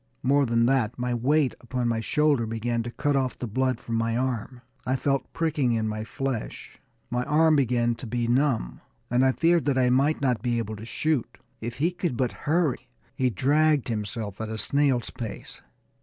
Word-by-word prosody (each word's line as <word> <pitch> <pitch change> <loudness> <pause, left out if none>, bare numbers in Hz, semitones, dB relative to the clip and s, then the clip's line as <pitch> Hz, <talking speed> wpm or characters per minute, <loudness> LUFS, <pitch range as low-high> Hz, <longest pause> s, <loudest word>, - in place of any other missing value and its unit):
More 140 +1 +3
than 115 0 +3
that, 125 -2 +1
my 125 0 -1
weight 135 +4 +2
upon 125 0 -2
my 115 -1 0
shoulder 145 -1 +2
began 115 +1 -1
to 115 - -5
cut 145 +4 -1
off 130 -2 0
the - - -4
blood 130 +2 0
from 115 -1 -3
my 115 0 0
arm. 125 -1 -3 0.2
I 130 +1 0
felt 135 +1 -1
pricking 150 -7 0
in 110 -1 0
my 110 0 -3
flesh, 135 0 -5 0.3
my 125 0 0
arm 155 +1 +4
began 120 -3 +2
to 115 +1 -8
be 120 +1 -1
numb, 125 - +1 0.3
and 125 +1 +3
I 130 - +5
feared 170 +4 +2
that 140 -2 +1
I 125 -1 +3
might 140 +5 +2
not 125 -4 +1
be 120 -1 0
able 110 -1 -3
to 110 - -8
shoot. 145 +2 -1 0.2
If 115 +1 -5
he 165 +6 +1
could 175 -8 -3
but 125 -1 +1 0.2
hurry! 160 -4 +1 0.3
He 130 -1 +1
dragged 145 +2 +2
himself 105 -1 -4
at 110 - -4
a 110 - -4
snail's 135 -1 +1
pace. 115 -3 -8
125 Hz, 195 wpm, -26 LUFS, 115-140 Hz, 0.3 s, I